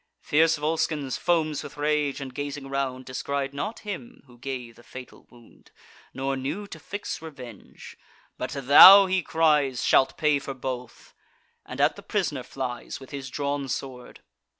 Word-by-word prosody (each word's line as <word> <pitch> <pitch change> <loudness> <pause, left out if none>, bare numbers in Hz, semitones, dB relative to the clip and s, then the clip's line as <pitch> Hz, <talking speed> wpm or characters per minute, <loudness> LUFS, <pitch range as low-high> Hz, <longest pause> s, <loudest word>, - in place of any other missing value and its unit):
Fierce 160 +2 +3
Volscens 150 -3 -1
foams 155 -4 0
with - - -10
rage, 145 -1 0
and, 135 -2 -7
gazing 145 0 -5
round, 135 -2 -3
Descried 135 +1 -3
not 210 +11 -5
him 180 - -8
who 120 -2 -19
gave 125 -3 -6
the - - -17
fatal 130 +1 -12
wound, 120 -2 -20 0.4
Nor 135 +1 -2
knew 145 +10 -4
to 160 - -9
fix 205 +5 -6
revenge: 130 -9 -11 0.4
"But - - -4
thou," 145 +9 +9
he 190 0 0
cries, 150 -6 +1
"Shalt 130 - +3
pay 150 -2 +2
for 135 -1 -7
both," 125 -2 -7 0.5
and - - -8
at - - +2
the - - -9
pris'ner - - -2
flies 125 -3 -6
With 135 - -13
his 135 -2 -6
drawn 140 +1 -3
sword. 130 -1 -7
140 Hz, 155 wpm, -25 LUFS, 130-150 Hz, 0.5 s, thou